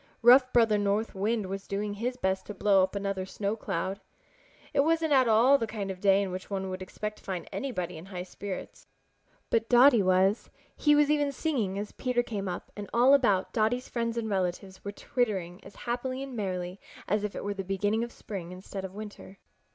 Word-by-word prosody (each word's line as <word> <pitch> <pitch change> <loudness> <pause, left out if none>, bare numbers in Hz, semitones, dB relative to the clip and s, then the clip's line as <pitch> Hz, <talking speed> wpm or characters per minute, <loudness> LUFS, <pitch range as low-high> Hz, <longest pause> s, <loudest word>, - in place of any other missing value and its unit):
Rough 255 +2 +7
Brother 225 -3 +4
North 205 +2 0
Wind 210 +2 0
was 195 +1 -6
doing 205 +1 -2
his 245 +5 -3
best 190 -4 -1
to 210 - -6
blow 195 -1 +4
up 185 +2 0
another 195 -1 -2
snow 200 +2 -3
cloud. 190 -2 -3 0.7
It 285 - +1
wasn't 320 +1 +3
at 260 -2 +5
all 240 +6 +5
the 225 - -1
kind 205 -3 -4
of 185 - -8
day 195 0 +4
in 190 - -4
which 185 +1 -6
one 190 -1 -3
would 185 0 -5
expect 210 +3 -5
to - - -23
find 185 -3 -4
anybody 185 -12 -3
in 175 - -12
high 180 -2 -5
spirits. 190 +1 -7 0.6
But 225 0 +1
Dotty 245 -1 +7
was. 190 +2 +2 0.3
He 295 -1 +4
was 295 0 +4
even 290 -1 +2
singing 255 - -1
as 205 +1 -4
Peter 250 -2 0
came 205 -5 -4
up, 175 -1 -5
and 205 -1 -7
all 250 +4 +5
about 205 -9 +3
Dotty's 235 +3 0
friends 230 -1 -2
and 230 -1 -1
relatives 190 -1 -2
were 200 - -4
twittering 195 -6 -2
as - - -13
happily 255 +2 -2
and 270 -2 -7
merrily 185 -3 -3 0.3
as 210 0 +1
if 210 - -3
it - - -5
were 205 - -2
the 195 -1 -5
beginning 205 +4 0
of 235 - -5
spring 185 -7 -7
instead 190 +1 -7
of 190 0 -7
winter. 205 -2 -9
205 Hz, 205 wpm, -29 LUFS, 190-240 Hz, 0.7 s, Rough